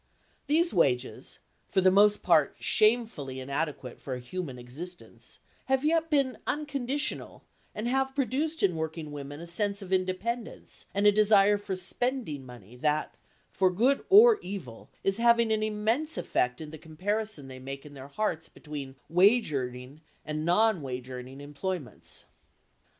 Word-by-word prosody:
These 325 +2 +3
wages, 130 -8 0 0.3
for - - +2
the 185 0 +5
most 205 +2 +5
part - - +4
shamefully 215 - +1
inadequate 140 -1 -4
for 130 - -5
a - - -6
human 135 +1 -5
existence, 155 +9 -8 0.2
have 265 +1 +1
yet 325 +1 +2
been 275 -4 +1
unconditional 285 -1 -2 0.3
and 215 +2 -3
have 265 +1 0
produced 285 +5 -1
in 185 -4 +3
working 160 -1 -4
women 145 0 -7
a 170 - -7
sense 200 +4 -1
of 190 0 -4
independence 190 +6 -2
and 200 +1 +1
a 205 - +8
desire 205 -1 +5
for 195 -2 -4
"spending 190 - -2
money" 120 -3 -13
that, 150 +3 0 0.4
for 190 -1 +3
good 240 +10 +2
or 435 +3 +8
evil, 180 - -8
is 195 +1 +2
having 235 -1 +4
an 215 0 +2
immense 220 +9 0
effect 125 +3 0
in 155 -1 -7
the 160 - -9
comparison 185 0 -2
they 130 -1 -9
make 135 +2 -7
in 145 - -11
their 135 -1 -9
hearts 165 0 -2
between 145 -3 -8
wage 195 +2 +4
earning 125 +2 -4 0.2
and 155 0 -3
non 190 +2 +3
wage 130 -1 -6
earning 130 +2 -8
employments. 145 +1 -4
185 Hz, 150 wpm, -29 LUFS, 145-225 Hz, 0.4 s, a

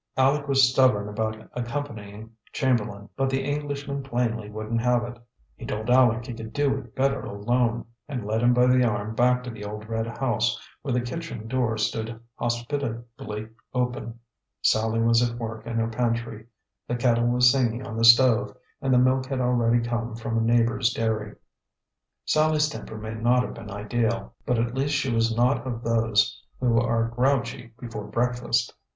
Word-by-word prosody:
Aleck 140 +2 +3
was 135 -2 +5
stubborn 125 -5 +3
about 110 +1 -2 0.2
accompanying 115 -4 -5 0.2
Chamberlain, 105 -7 0
but 135 0 0
the 135 0 0
Englishman 145 -1 -3
plainly 120 -5 -2
wouldn't 110 +2 -3
have 125 0 +2
it. 120 0 -7 0.4
He - - -12
told 110 +2 -4
Aleck 120 -2 +4
he 125 - -6
could 110 -1 -8
do 140 0 +2
it 120 -4 -14
better 135 +1 +1
alone, 115 +3 0 0.2
and 125 -7 -4
led 110 +2 0
him 120 0 +5
by 125 0 +4
the 125 0 +4
arm 110 -2 -1
back 125 +2 +3
to 125 - -6
the 110 -2 -9
old 105 +1 -7
red 115 0 -2
house, 115 -2 0 0.2
where 140 - -4
the 125 0 +1
kitchen 120 -3 -6
door 120 -2 0
stood 110 +1 -2
hospitably 120 -3 -4 0.3
open. 125 -2 -2 0.4
Sallie 110 +1 +2
was 115 0 +4
at 120 -1 0
work 115 -1 -6
in 115 - -3
her 115 0 +1
pantry. 115 -1 -2 0.4
The 120 - -1
kettle 120 -1 +2
was 125 +1 +5
singing 125 -2 0
on 110 - -6
the 115 - -1
stove, 120 +1 +6 0.2
and 135 -2 0
the 125 - +5
milk 130 +1 +3
had 135 -1 -2
already 120 -1 +2
come 120 -1 -2
from 115 0 -4
a 115 - +2
neighbor's 115 +1 +2
dairy. 110 -2 -2 0.9
Sallie's 155 0 +3
temper 110 -6 -7
may 110 +1 -6
not 120 +3 +2
have - - -5
been 110 -3 -9
ideal, 115 +3 -2
but 125 - +2
at 115 +1 0
least 140 +3 0
she 135 -3 0
was 115 0 +1
not 125 +2 +2
of 120 -2 -4
those 115 -2 +1 0.2
who 120 -2 +3
are 115 -1 +1
grouchy 125 -1 -1
before 110 -4 -6
breakfast. 120 0 0
120 Hz, 175 wpm, -25 LUFS, 115-125 Hz, 0.9 s, stove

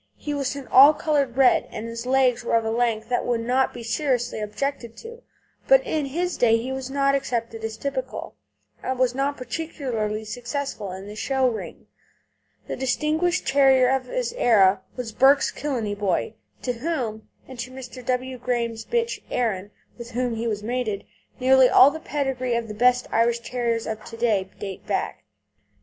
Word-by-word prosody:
He 295 - -4
was 280 -1 -2
an 280 -2 -7
all 280 +4 +8
coloured 280 -5 0
red, 265 -2 +4
and 215 - -6
his 230 +1 -6
legs 255 -2 +3
were 235 - +1
of 225 -1 +2
a 220 - 0
length 225 -2 0
that 245 - +1
would 240 -2 0
not 255 +3 +2
now - - -21
be 240 - -7
seriously 245 0 -1
objected 235 +2 -4
to. 470 +1 -10 0.5
But - - +6
in 305 -3 -1
his 350 +6 -2
day 230 -2 +4
he 245 +3 -4
was 265 -1 -4
not 275 0 +2
accepted 230 -4 -2
as 220 0 -4
typical, 265 -1 -4 0.5
and 260 0 -2
he - - -12
was 255 -1 +3
not 275 +2 -1
particularly 240 -6 -3
successful 245 -2 -4
in 190 +1 -8
the 205 +1 -9
show 265 +3 +1
ring. 210 -9 -5 0.8
The - - -4
distinguished 310 +7 0
terrier 270 -2 +5
of 265 -1 0
his - - -2
era 200 - +4
was 245 -3 -5
Burke's 270 +5 +4
Killeney 240 -8 -3
Boy, 205 0 -1 0.3
to 250 - -1
whom, 235 -5 -3 0.2
and 260 -2 -11
to 240 +2 -4
Mr. 255 -1 -9
W. 255 +1 -2
Graham's 235 -2 -2
bitch 470 0 -1
Erin, 205 -6 -1 0.3
with 235 0 -7
whom 245 0 -1
he 230 +1 -3
was 210 -2 -2
mated, 225 -3 -2 0.3
nearly 260 0 +6
all 275 - +7
the 315 - -6
pedigrees 265 -5 -1
of 235 -1 -3
the 210 - -6
best 250 +3 +3
Irish 235 +1 +2
Terriers 235 -1 -2
of 220 -1 -5
to 230 - -9
day 210 -5 +1
date 195 -2 -7
back. - - -2
250 Hz, 185 wpm, -24 LUFS, 225-270 Hz, 0.8 s, all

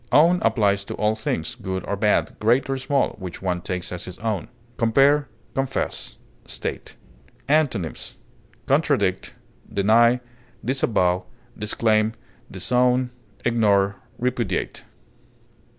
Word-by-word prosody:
Own 170 +4 +6
applies 100 -3 +2
to - - -5
all 105 0 +1
things, 110 -7 -2
good 95 -1 -4
or 100 - -1
bad, 105 +1 +1
great 120 +5 +3
or 135 - 0
small, 135 +1 +1
which 95 -1 -7
one 90 -2 -1
takes 90 0 -4
as 90 - -5
his 90 0 -8
own. 110 -4 -2 0.3
Compare 140 +6 +4 0.3
CONFESS; 135 -1 -3 0.3
STATE. - - -5 0.5
Antonyms: 135 - 0 0.5
contradict, - - +1 0.4
deny, 115 +5 +4 0.5
disavow, 95 -9 +1 0.3
disclaim, 110 +1 +1 0.4
disown, 125 0 +1 0.3
ignore, 100 -4 +3 0.2
repudiate. 120 -6 -2
110 Hz, 105 wpm, -23 LUFS, 100-125 Hz, 0.5 s, Own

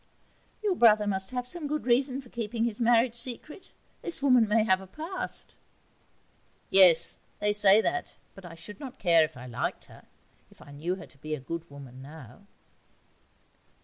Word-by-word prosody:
'Your 410 -3 +1
brother 215 -8 +4
must 190 -1 -1
have 250 -1 -4
some 305 +4 -2
good 300 +1 -3
reason 260 +2 +1
for 250 - -17
keeping 230 -1 -3
his 230 -2 -2
marriage 235 0 +3
secret. 255 - -5 0.3
This 340 -5 0
woman 250 -5 +4
may 215 +1 +3
have 190 -3 +2
a 190 - -12
past.' 325 - -5 1.2
'Yes, 175 -4 +6 0.2
they 210 0 0
say 205 0 +6
that 360 +9 -3 0.2
but 195 - -14
I 170 -2 -10
should 170 +8 -10
not 265 -3 -9
care 170 -3 +4
if 155 - -5
I 125 - -10
liked 120 -2 -4
her, - - -17 0.4
if - - -22
I 145 - -14
knew 160 +6 -3
her 190 - -10
to 135 - -23
be 155 +1 -4
a - - -9
good 165 +5 -7
woman 135 -3 -12
now.' 145 - -13
210 Hz, 180 wpm, -28 LUFS, 165-250 Hz, 1.2 s, Yes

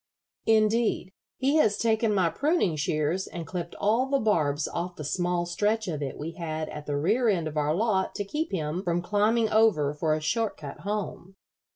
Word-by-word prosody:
Indeed, 220 -3 +2 0.3
he 275 +4 +2
has 215 -9 +3
taken 225 -1 +2
my 185 -5 +2
pruning 290 - +1
shears 155 +4 -1
and 170 -1 -6
clipped 170 +1 -5
all 230 +6 +2
the 275 +1 +2
barbs 155 - +1
off 175 +1 -4
the 150 - -7
small 175 +3 0
stretch 210 +5 0
of 155 -4 -3
it 135 -2 -4
we 155 +3 -5
had 160 -2 -4
at 150 - -8
the 145 -1 -1
rear 220 - +2
end 170 -6 +1
of 155 - -6
our 150 +1 +1
lot 200 -1 0
to 205 - -2
keep 305 - -3
him 160 -1 -2
from 175 -2 -1
climbing 215 +4 +2
over 205 -10 +3
for 155 +1 0
a - - -2
short 215 +8 -1
cut 145 -1 -8
home." 195 0 -4
185 Hz, 195 wpm, -27 LUFS, 155-220 Hz, 0.3 s, has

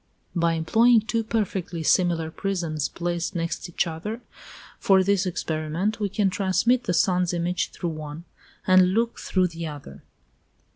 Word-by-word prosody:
By 170 -1 +2
employing 225 +9 +4
two 225 +1 -1
perfectly 195 -6 -2
similar 165 -2 +2
prisms 165 -6 -2
placed 175 +1 -3
next 170 +1 -3
each 175 - 0
other, 175 +8 -5 0.6
for 190 -1 +4
this 195 0 +1
experiment, 165 +5 -2
we 205 -2 -1
can 195 0 +1
transmit 230 +6 +1
the 180 - 0
sun's 180 -1 +2
image 175 0 -1
through 175 - -4
one, 155 +1 -7 0.4
and 185 0 +5
look 230 +1 0
through 185 -1 +1
the 165 0 -6
other. 145 - -9
180 Hz, 145 wpm, -25 LUFS, 165-200 Hz, 0.6 s, and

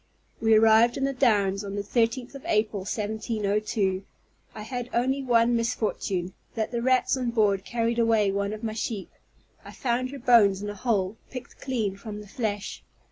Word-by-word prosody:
We 225 -1 +5
arrived 225 +2 +5
in 270 - -2
the 275 0 +1
Downs 205 -6 +2
on 200 0 -5
the 205 - -2
13th 235 +4 0
of 275 - -10
April, 215 -1 +1
1702. 210 -1 -1 0.5
I 215 - -6
had 245 +2 -5
only 260 +3 +1
one 240 -2 +3
misfortune, 205 -5 -1 0.2
that 220 -1 -2
the 235 -1 -2
rats 255 +1 +3
on 250 -2 -1
board 210 -4 +2
carried 235 +1 -1
away 225 -3 +3
one 200 +1 -1
of 215 +1 -7
my 220 -1 -2
sheep; 220 -2 -4 0.5
I - - -10
found 255 0 -1
her 280 - -7
bones 230 -6 +5
in 205 - -3
a - - -7
hole, 205 -2 0
picked 255 - -9
clean 220 -7 -2
from 210 0 -7
the 210 - -11
flesh. 205 -1 -4
220 Hz, 180 wpm, -26 LUFS, 205-240 Hz, 0.5 s, We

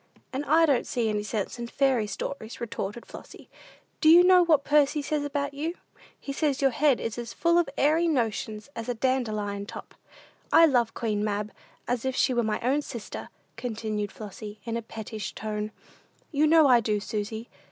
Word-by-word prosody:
"And 270 +2 -2
I 325 +3 +5
don't 280 -6 +1
see 235 -3 0
any 210 -1 0
sense 210 +2 -3
in 235 - -4
fairy 255 -4 +1
stories," 225 +1 -6
retorted 225 -1 -5
Flossy. - - -12 0.5
"Do 315 - +5
you 345 +2 +9
know 365 0 +6
what 310 -5 +3
Percy 295 0 +3
says 295 0 -1
about 285 0 -2
you? 315 +5 -3 0.4
He 275 - -5
says 285 -2 0
your 270 -1 +3
head 280 +1 +3
is 230 +1 -4
as 235 -1 -6
full 340 0 +3
of 340 - +1
airy 315 +4 +3
notions 220 -6 -1
as 230 +1 -5
a 245 - -1
dandelion 215 -5 -1
top. - - -9 0.6
I 330 - +8
love 240 -7 +2
Queen 210 -3 -1
Mab 210 0 -2 0.4
as 245 -1 -1
if 260 -1 -1
she 260 - +2
was 240 -2 +1
my 210 - -1
own 270 +5 +1
sister," 235 -6 -7 0.3
continued 215 -3 -3
Flossy, 210 0 -9
in 230 0 -4
a 235 - -2
pettish 220 -2 -7
tone. 210 -1 -3 0.6
"You 300 0 +3
know 320 0 +6
I 245 -2 +6
do, 215 -2 0
Susy. 220 +2 -4
240 Hz, 185 wpm, -27 LUFS, 215-285 Hz, 0.6 s, you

